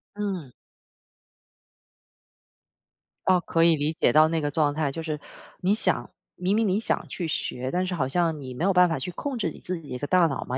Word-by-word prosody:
嗯。 190 -10 -4 2.7
哦， 185 -1 +5
可 165 0 +1
以 165 -1 +6
理 150 +2 -1
解 125 - +2
到 155 +1 +7
那 165 -1 0
个 145 - 0
状 145 -1 +1
态， 150 -2 -1
就 165 +3 -5
是 155 -2 -3 0.4
你 190 +3 +3
想 - - 0 0.3
明 185 +3 0
明 220 -1 +2
你 190 +3 +2
想 - - -1
去 175 - -4
学， 130 -4 -2
但 180 +1 0
是 185 - -3
好 140 -7 0
像 165 +2 +1
你 130 -2 -7
没 140 - -4
有 195 +1 +3
办 180 0 +5
法 160 - -1
去 135 +7 -4
控 265 +8 -4
制 170 -8 -1
你 - - -12
自 180 -2 -4
己 150 - -13
一 125 - -4
个 145 - -4
大 180 0 +5
脑 140 -4 -3
嘛， 125 - -3
165 Hz, 235 characters per minute, -26 LUFS, 145-185 Hz, 2.7 s, 到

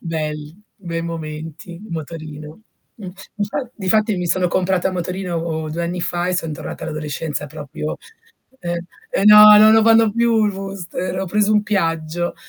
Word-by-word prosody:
Belli, 155 -1 -5 0.2
bei 170 -4 -5
momenti 160 +1 -7
il 195 +6 -11
motorino. 155 0 -7 0.4
Mh, 195 - -7 0.3
infa 230 +5 -3
difatti 215 +1 +1
mi 180 - -2
sono 180 +1 +1
comprata 185 0 +1
a - - -4
motorino 170 -3 -3
2 170 +2 -3
anni 175 +1 -3
fa 175 +1 -2
e 185 - 0
son 165 -3 -2
tornata - - -7
all'adolescenza 150 -1 -4
proprio, 150 +2 -6 0.6
ehm 175 0 -3 0.4
eh 195 - +1
no, 210 0 +10
non 215 +1 +7
lo 220 0 +5
fanno 225 -1 +5
più 230 -1 +2
il 205 - +1
booster, 190 -2 -5
ho 190 - -1
preso 210 +3 +1
un 210 - +3
Piaggio. 170 -4 -1
175 Hz, 165 wpm, -20 LUFS, 160-205 Hz, 0.6 s, no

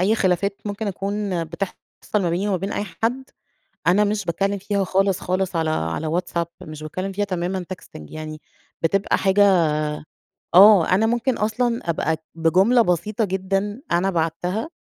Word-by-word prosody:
أي 200 +5 +3
خلافات 195 0 +1
ممكن 205 +1 -4
أكون 195 -2 -2
بتحصل 170 +4 -4 0.5
ما 175 - 0
بيني 185 +5 -1
وما 195 - +1
بين 195 +3 -4
أي 205 - -2 0.2
حد، 250 +4 0 0.6
أنا 200 +4 +5
مش 205 -1 -1
باتكلم 195 +4 -1
فيها 200 0 -1
خالص، 195 0 +1
خالص 185 -1 -1
على 160 -1 +1
على 80 - -2
WhatsApp 170 -1 -3 0.2
مش 155 0 -8
باتكلم 185 +6 -4
فيها 205 +2 -1
تمامًا 185 -1 -2
texting 75 - -13
يعني 155 0 -7 0.4
بتبقى 195 +4 +1
حاجة 195 -2 +4 0.9
آه، 195 -2 +8
أنا 195 +4 +3
ممكن 240 +2 0
أصلًا 230 -1 -1
أبقى 160 -1 0 0.2
بجملة 190 +9 +4
بسيطة 210 +4 0
جدًا 195 +4 -2
أنا 180 +3 +2
بعتّها، 175 - -1
190 Hz, 155 wpm, -22 LUFS, 170-205 Hz, 0.9 s, آه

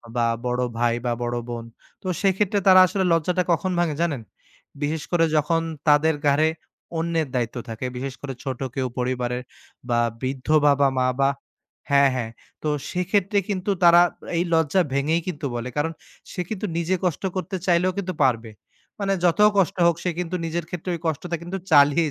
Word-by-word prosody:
বা 120 - +2 0.2
বড় 125 0 0 0.2
ভাই, 120 0 +2
বা 120 - +1
বড় 120 0 -2
বোন, 115 -1 -5 0.4
তো 185 - -7
সেক্ষেত্রে 200 +1 +2
তারা 185 -1 +9
আসলে 190 +2 -1
লজ্জাটা 180 +3 +1
কখন 185 +3 +1
ভাঙে 165 -4 +1
জানেন? 145 -8 0 0.6
বিশেষ 150 +1 -1
করে 170 -2 +4
যখন 165 +2 +2 0.3
তাদের 150 +1 +4
ঘাড়ে 145 +3 +4 0.5
অন্যের 165 -2 0
দায়িত্ব 120 0 -1
থাকে। 115 +3 -5
বিশেষ 130 +1 -4
করে 135 -2 -5
ছোট 130 -1 -4 0.2
কেউ 130 -1 0
পরিবারের 125 0 -1 0.5
বা 120 0 +2 0.2
বৃদ্ধ 130 0 -4 0.2
বাবা-মা 135 -2 +3
বা 135 - +4 0.6
হ্যাঁ, 140 -1 +5
হ্যাঁ। 115 -3 -3 0.3
তো 155 - 0 0.2
সেক্ষেত্রে 195 +3 +1
কিন্তু 195 0 -2
তারা 170 0 +8 0.4
এই 170 - +2
লজ্জা 160 +3 +3
ভেঙেই 150 +5 +1
কিন্তু 150 -5 -4
বলে। 120 +1 -4
কারণ 155 +3 0 0.4
সে 180 - -3
কিন্তু 210 -1 -3
নিজে 170 +2 +1
কষ্ট 175 0 -1
করতে 185 0 -3
চাইলেও 180 +1 +3
কিন্তু 185 -2 -2
পারবে। 115 -4 +1 0.5
মানে 195 -1 0
যত 175 +3 +2 0.2
কষ্ট 195 0 +2
হোক, 170 - +3
সে 180 - 0
কিন্তু 180 0 -3
নিজের 165 0 -3
ক্ষেত্রে 180 +1 -4
ঐ - - -4
কষ্টটা 165 +2 -2
কিন্তু 175 +3 -5
চালিয়ে 145 +2 +5
160 Hz, 170 wpm, -23 LUFS, 135-180 Hz, 0.6 s, তারা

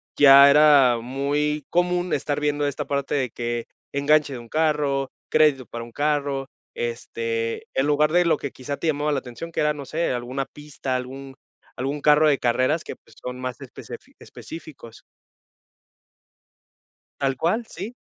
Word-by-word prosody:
ya 140 -1 +9
era 140 -5 +6
muy 145 +3 -1
común 180 0 +1
estar 145 +1 -1
viendo 145 0 0
esta 145 0 -3
parte 140 0 -2
de 130 -4 0
que 120 -1 -3 0.3
enganche 145 0 +2
de 125 - -6
un 115 -1 -13
carro, 150 -4 0 0.2
crédito 140 -5 +3
para 115 0 -7
un 120 - -12
carro, 145 -2 -1 0.3
este, 115 -1 -3
en 135 +2 +1
lugar 150 +1 +3
de 175 0 +4
lo 160 -2 +3
que 140 - -5
quizá 140 +2 -6
te - - -6
llamaba 150 0 0
la 140 - +1
atención, 130 +7 -9
que - - -4
era, 150 0 +2
no 140 -2 -8
sé, 165 +1 -1
alguna 125 +3 -3
pista, 145 -3 -6
algún 135 +2 -6 0.4
algún 140 +3 -3
carro 150 +1 +5
de 140 -2 +3
carreras 130 +6 +1
que, - - -7
pues, - - -23
son 125 0 -6
más 125 -2 -5
especefi - - -11
específicos. 150 -8 -11 2.1
Tal 135 -2 -1
cual, 220 +8 0
sí. 235 +4 -8
140 Hz, 165 wpm, -23 LUFS, 130-150 Hz, 2.1 s, ya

